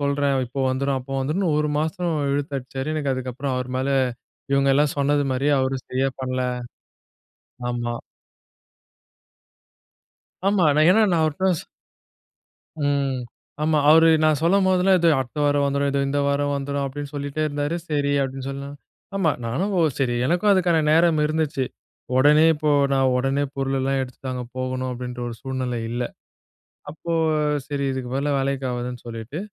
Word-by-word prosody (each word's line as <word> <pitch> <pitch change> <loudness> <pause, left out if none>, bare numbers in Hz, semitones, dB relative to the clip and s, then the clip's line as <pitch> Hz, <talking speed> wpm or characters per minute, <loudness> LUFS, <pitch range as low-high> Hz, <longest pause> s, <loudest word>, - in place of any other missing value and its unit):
சொல்றேன், 140 -1 +1
இப்போ 135 +3 -5
வந்துரும் 135 +1 0
அப்போ 135 +2 -7
வந்துரும்னு 160 +7 0
ஒரு 150 0 0
மாசம் 170 +2 -1 0.2
இழுத்தடிச்சாரு. 135 -1 -3
எனக்கு 145 -3 0
அதுக்கப்புறம் 130 +1 -3
அவர் 125 0 -3
மேல 130 +1 -1 0.6
இவங்க 140 0 +3
எல்லாம் 145 0 +2
சொன்னது 145 +1 +2
மாரியே 140 +3 +1
அவரு 130 0 0
சரியா 135 +1 0
பண்ணல. 130 0 -1 1.3
ஆமா. 120 -1 -2 2.5
ஆமா, 195 -4 +3 0.2
ஏன்னா 220 +4 +5
நான் 170 -2 +2
அவர்ட்ட 160 +5 +1
சொ - - -10 1.2
ம். 140 -2 0 0.4
ஆமா 155 -1 +2
அவரு 160 +1 +7 0.2
நான் 155 -2 +3
சொல்லும்போதெல்லாம் 190 +1 +4
இதோ 170 - +4
அடுத்த 130 +2 -4
வாரம் 145 0 +2
வந்துரும், 140 0 +1
இதோ 140 - 0
இந்த 145 +1 0
வாரம் 145 0 +1
வந்துரும் 140 0 -2
அப்டின்னு 140 +1 -6
சொல்லிட்டே 145 +1 -3
இருந்தாரு 145 +2 -2
சரி 145 -2 0
அப்டின்னு 135 0 -5
சொல்ல 140 0 -5 0.5
ஆமா. 180 -6 +2
நானும் 180 - -1
ஒ, - - +4 0.2
சரி 125 -3 +1
எனக்கும் 175 +8 +2
அதுக்கான 180 -4 +3
நேரம் 165 -1 +4
இருந்துச்சு. 155 -3 -1 0.5
உடனே 150 +3 +6
இப்போ 150 -1 0 0.2
நான் 135 -1 +3
உடனே 135 +2 +1
பொருள் 135 0 -1
எல்லாம் 135 +1 0
எடுத்துட்டு 130 0 -6
அங்க 125 -1 -4
போகணும் 130 0 -2
அப்டின்ற 125 0 -6
ஒரு 115 - -6
சூழ்நிலை 130 -2 -3
இல்ல. 120 +1 -2 0.9
அப்போ 165 +2 -5 0.5
சரி 140 -1 -2
இதுக்கு, 130 -2 -4
பதிலா 140 +2 0
வேலைக்கு 135 -1 -1
ஆகாதுன்னு 125 0 -5
சொல்லிட்டு, 115 +6 -6
140 Hz, 145 wpm, -23 LUFS, 130-155 Hz, 2.5 s, அவரு